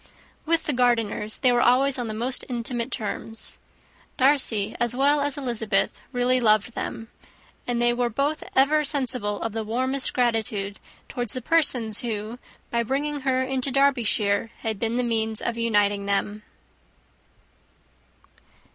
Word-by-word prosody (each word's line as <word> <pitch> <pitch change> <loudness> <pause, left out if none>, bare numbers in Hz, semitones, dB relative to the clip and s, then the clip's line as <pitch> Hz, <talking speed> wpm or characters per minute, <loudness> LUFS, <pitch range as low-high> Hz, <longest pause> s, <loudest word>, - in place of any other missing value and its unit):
With 330 0 +2
the 295 - -1
Gardiners 230 -4 0
they 255 - +4
were 240 0 +2
always 260 +2 +3
on 240 - -3
the 215 - -5
most 245 +4 0
intimate 235 -1 -2
terms. 220 +1 +1 0.6
Darcy, 260 -7 +2
as 240 0 +1
well 285 +2 +3
as 285 0 -1
Elizabeth, 230 -6 -1
really 250 0 +2
loved 215 0 +2
them; 225 -1 -5 0.6
and 240 -1 -1
they 240 0 +3
were 240 0 0
both 280 +6 -1
ever 295 +3 +4
sensible 255 -8 -1
of 225 - -2
the 220 +1 -3
warmest 260 +5 0
gratitude 220 -5 -1 0.3
towards 245 -3 -3
the 255 - -3
persons 250 -10 +2
who, 225 0 -4 0.3
by 235 - +1
bringing 285 +5 -2
her 260 -1 0
into 265 0 -1
Derbyshire, 235 -6 +1
had 220 -3 -3
been 230 0 -1
the 250 - +1
means 220 -2 0
of 235 - -2
uniting 205 -3 +1
them. 205 +1 -1
240 Hz, 145 wpm, -24 LUFS, 220-265 Hz, 0.6 s, they